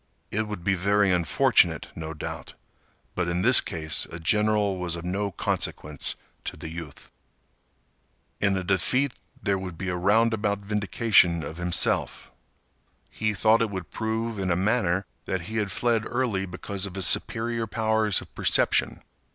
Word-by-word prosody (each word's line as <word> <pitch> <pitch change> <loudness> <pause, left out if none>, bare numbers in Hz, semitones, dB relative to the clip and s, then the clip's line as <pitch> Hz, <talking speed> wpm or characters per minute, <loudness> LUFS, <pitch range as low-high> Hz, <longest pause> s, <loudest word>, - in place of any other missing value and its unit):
It 110 +1 -1
would 105 -5 -6
be 100 - +2
very 100 +2 +2
unfortunate, 85 -3 +2
no 80 0 -6
doubt, - - -7 0.6
but 90 -1 -1
in 85 +1 -1
this 125 +2 +7
case 80 -4 0
a 80 - -6
general 105 +2 +2
was 90 -1 -2
of 85 0 -7
no 100 +3 -1
consequence 75 -5 -1 0.3
to - - -4
the 80 - -7
youth. 80 -3 -9 1.3
In 100 -2 +2
a 95 - -2
defeat 120 +9 +1 0.3
there 100 -2 +1
would 90 -3 -7
be 95 +2 -4
a 90 - -1
roundabout 105 +2 +2
vindication 100 -4 +2
of 80 +3 -7
himself. 85 0 0 0.8
He 110 -1 -1
thought 110 +3 +4
it 115 - +1
would 95 -4 -6
prove, 110 0 -3
in 95 -1 -1
a 85 - +2
manner, 95 -1 +1 0.2
that 95 -1 -2
he 110 +6 -5
had 105 -2 0
fled 115 -2 +1
early 115 -7 -1
because 95 +2 -5
of 95 - -10
his 95 -2 0
superior 115 +3 0
powers 110 -2 +2
of - - -14
perception. - - +1
100 Hz, 160 wpm, -26 LUFS, 90-110 Hz, 1.3 s, this